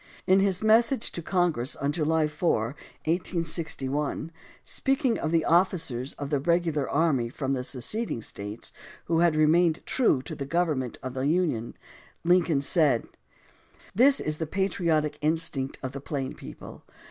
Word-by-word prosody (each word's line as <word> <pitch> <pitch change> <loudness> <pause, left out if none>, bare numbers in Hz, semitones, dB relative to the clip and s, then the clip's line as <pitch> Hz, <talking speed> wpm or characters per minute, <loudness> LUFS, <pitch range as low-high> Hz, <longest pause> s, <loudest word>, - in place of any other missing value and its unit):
In 190 +1 +5
his 195 0 +2
message 230 +3 +3
to 170 - -5
Congress 165 -7 0
on 140 +1 -1
July 160 0 +1
4, 150 -6 0 0.3
1861, 160 -3 -1 0.3
speaking 270 -3 0
of 155 - -1
the 165 -1 +1
officers 160 -8 +1
of 145 0 -6
the 145 - +2
regular 165 -2 0
army 140 -6 +1
from 135 +2 -3
the 125 -2 -2
seceding 130 - -1
States 105 +2 -5 0.3
who 165 -1 +1
had 170 -2 +3
remained 160 +2 +3
true 190 - +2
to - - -7
the 140 - -5
government 145 -5 -1
of 130 -1 -5
the 130 +1 -1
Union, 155 -9 0 0.5
Lincoln 170 -4 +3
said: 140 -5 +3 0.9
This 270 +6 +5
is 155 0 -2
the 160 - -2
patriotic 170 -5 0
instinct 150 -3 0
of 130 - -3
the 140 0 -7
plain 140 -2 -4
people. - - -11
155 Hz, 145 wpm, -27 LUFS, 140-175 Hz, 0.9 s, In